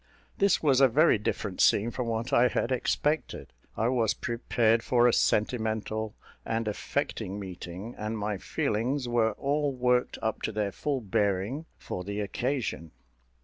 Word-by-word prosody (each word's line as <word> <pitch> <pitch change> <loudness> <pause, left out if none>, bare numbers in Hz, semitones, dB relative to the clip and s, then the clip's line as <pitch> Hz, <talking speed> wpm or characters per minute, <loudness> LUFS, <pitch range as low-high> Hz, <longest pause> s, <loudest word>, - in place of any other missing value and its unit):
This 200 -4 +3
was 140 -3 +4
a 135 - +8
very 140 -1 +4
different 105 -2 -2
scene 110 +4 +4
from 125 0 -3
what 115 +1 -2
I 120 +1 +6
had 120 - -1
expected. 145 - -1 0.2
I 110 - +1
was 120 -4 +1
prepared 115 -1 +1
for 120 0 +3
a 120 - +3
sentimental 110 -1 0 0.3
and 115 0 -2
affecting 100 -1 -3
meeting; 95 +3 -7
and 110 +1 -3
my 105 -2 -2
feelings 125 +5 -1
were 115 -2 +2
all 145 +5 0
worked 125 -1 +1
up 110 0 -1
to - - -2
their 105 -2 -1
full 140 +2 -2
bearing 100 - -1
for 90 - -5
the 100 +2 -4
occasion. 115 - -2
115 Hz, 150 wpm, -28 LUFS, 105-125 Hz, 0.3 s, a